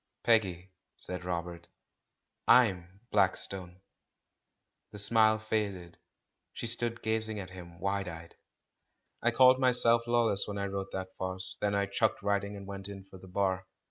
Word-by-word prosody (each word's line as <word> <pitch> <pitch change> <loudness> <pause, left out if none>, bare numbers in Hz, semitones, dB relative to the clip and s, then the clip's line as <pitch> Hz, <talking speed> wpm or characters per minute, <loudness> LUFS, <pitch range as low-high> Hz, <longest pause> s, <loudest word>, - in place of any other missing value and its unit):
"Peggy," 95 -5 +1 0.3
said 90 0 -6
Robert; 85 -1 -5 0.8
"Fm 95 -9 +5 0.2
Blackstone." 95 -2 0 1.1
The - - -9
smile 110 +1 +4
faded; 100 -5 -3 0.5
she - - -6
stood 120 0 -2
gazing 110 -1 -1
at 95 -2 -8
him 85 -2 -11
wide 100 +1 -1
eyed. 85 -1 -9 0.9
"I 120 - +3
called 130 +2 +6
myself 120 -2 +5
'Lawless' 115 -4 +2
when 100 -1 -5
I 100 - -2
wrote 100 0 -4
that 95 0 -5
farce, 95 0 -3
and 100 -1 +1
then - - +2
I - - +1
chucked 100 +2 0
writing 100 0 -1
and 100 - -9
went 100 0 -7
in 100 -1 -9
for 95 - -11
the 95 - -13
Bar. 95 0 -1
100 Hz, 150 wpm, -30 LUFS, 95-110 Hz, 1.1 s, called